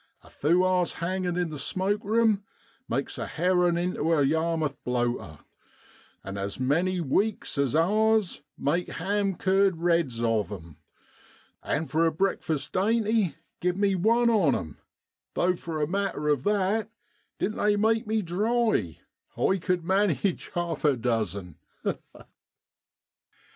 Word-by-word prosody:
A - - -17
few 175 +5 +2
hours 180 -1 +1
hangin' 180 +1 -2
in 175 -3 -1
the 150 - -6
smoke 195 +8 -1
rume 220 -1 +2 0.5
makes - - -2
a - - -3
herrin' 180 0 +2
intu 175 -2 -1
a 150 -3 +3
Yarmith 160 -1 0
blowter; 120 -10 -2 0.9
an' 100 0 -6
as 100 +3 -4
many 170 +8 +1
weeks 195 +8 0
as 140 0 +1
hours 215 +4 +2 0.2
make 165 +6 0
ham 195 +2 -1
cured 190 0 +2
reds 165 -9 +1
of 110 -3 +1
'em. 85 -6 -9 0.8
And 155 +2 -2
for 160 +5 +2
a - - +1
breakfast 160 -4 -1
dainty 215 -1 +1 0.2
give 180 +1 0
me 200 -1 +2
one 230 +6 +3
on 190 -11 +3
'em, 80 -5 -5 0.6
though 180 +1 +2
for 165 -2 -5
a 150 - +2
matter 185 -4 -1
of 145 -3 +1
that, 210 +2 +1 0.5
didn't 215 - -2
they 210 0 +3
make 220 +1 +1
me 220 0 0
dry, 210 - 0 0.4
I 190 - +2
cud 180 -1 0
manage 190 -2 +1
half 175 -1 -2
a 145 -4 +3
dozen. 110 -7 -2
175 Hz, 140 wpm, -27 LUFS, 150-200 Hz, 0.9 s, a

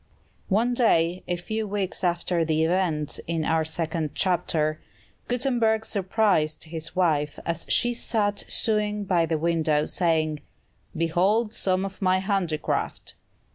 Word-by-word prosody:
One 225 +5 +2
day, 180 -7 +2
a 175 - 0
few 215 +5 -3
weeks 195 -2 -3
after 175 -1 +1
the 160 0 +1
events 160 -4 0
in 165 -1 -1
our 160 0 +2
second 160 -1 -2
chapter, 160 -4 +1 0.5
Gutenberg 235 -3 +1
surprised 190 -6 +1
his 160 +1 -6
wife 150 -5 +1
as 170 -1 -3
she 240 0 +3
sat 210 -3 0
sewing 210 -2 0
by 175 -4 +2
the 160 0 0
window, 155 -2 +1
saying, 155 -4 0 0.6
"Behold 190 +7 +1
some 185 -2 0
of 195 0 -8
my 185 -1 +3
handicraft!" 185 -5 -2
175 Hz, 130 wpm, -25 LUFS, 160-205 Hz, 0.6 s, she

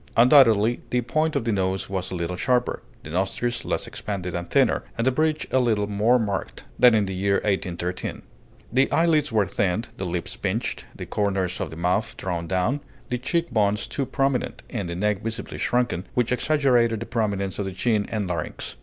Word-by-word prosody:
Undoubtedly 120 -3 +6
the 125 - +1
point 155 +5 0
of 135 -5 0
the 115 - +1
nose 95 -1 0
was 95 -1 -3
a - - -4
little 85 +1 -2
sharper, 125 +6 0 0.2
the 75 - -8
nostrils 105 +7 -1
less - - -1
expanded 90 -3 -5
and 85 0 -4
thinner, 135 -5 +3
and 115 - 0
the 130 - +4
bridge 155 +3 +1
a 130 - +4
little 110 -5 +2
more 105 +4 +3
marked, 105 -4 -3 0.2
than 125 -2 +7
in 105 -2 +3
the 95 - -4
year 100 +1 +1
1813. 90 -3 -2 0.5
The 135 +2 +3
eyelids 155 -3 +3
were 110 -3 +3
thinned, 100 +3 -1
the 95 - -3
lips 85 0 -3
pinched, - - -3
the - - -6
corners 95 -3 -1
of - - -2
the - - -9
mouth 90 +6 0
drawn 85 -2 -3
down, 95 - +1 0.3
the 125 - -1
cheek 170 +7 -1
bones 105 -1 +1
too 135 - -2
prominent, 135 -2 -1
and 100 -8 -3
the 85 - -3
neck 105 +2 0
visibly 115 0 -5
shrunken, 120 -7 0
which 120 -1 +1
exaggerated 125 -5 +2
the 115 - -5
prominence 100 -5 -1
of 100 - -1
the 95 - -3
chin 105 +2 0
and 105 -3 -1
larynx. 85 -3 -4
105 Hz, 195 wpm, -24 LUFS, 95-125 Hz, 0.5 s, than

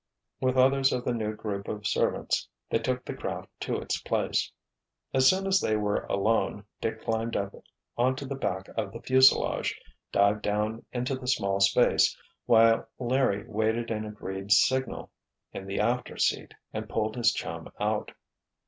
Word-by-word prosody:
With 130 0 +1
others 135 +1 +4
of 125 -1 -2
the 125 - +1
new 110 -2 -2
group 100 -2 -5
of 105 -1 -5
servants 105 - 0 0.2
they - - +2
took - - -2
the - - -4
craft - - -5
to - - -2
its - - -2
place. - - 0 0.6
As 130 0 +6
soon 190 +1 +1
as 195 0 +3
they 110 - +1
were 105 -1 0
alone, 105 0 0 0.2
Dick 110 0 -3
climbed 115 0 -1
up 100 0 -2 0.5
onto 130 +3 +1
the 140 - -4
back 95 -8 -3
of 110 - -4
the 115 - -7
fuselage, 130 +1 +4 0.3
dived 100 +1 +3
down 105 +2 -1
into 125 +2 -2
the 130 -1 -5
small 100 -6 +1
space, 100 0 +4 0.3
while 115 -1 +5
Larry 125 -5 +1
waited 110 +2 -1
an 110 -1 -2
agreed 100 -2 -6
signal, 130 +5 +2 0.4
in 95 - -7
the 95 - -3
after 120 +3 0
seat, - - 0 0.2
and - - -5
pulled 110 -1 -1
his 120 -2 +3
chum - - -6
out. - - -1
115 Hz, 165 wpm, -28 LUFS, 105-130 Hz, 0.6 s, As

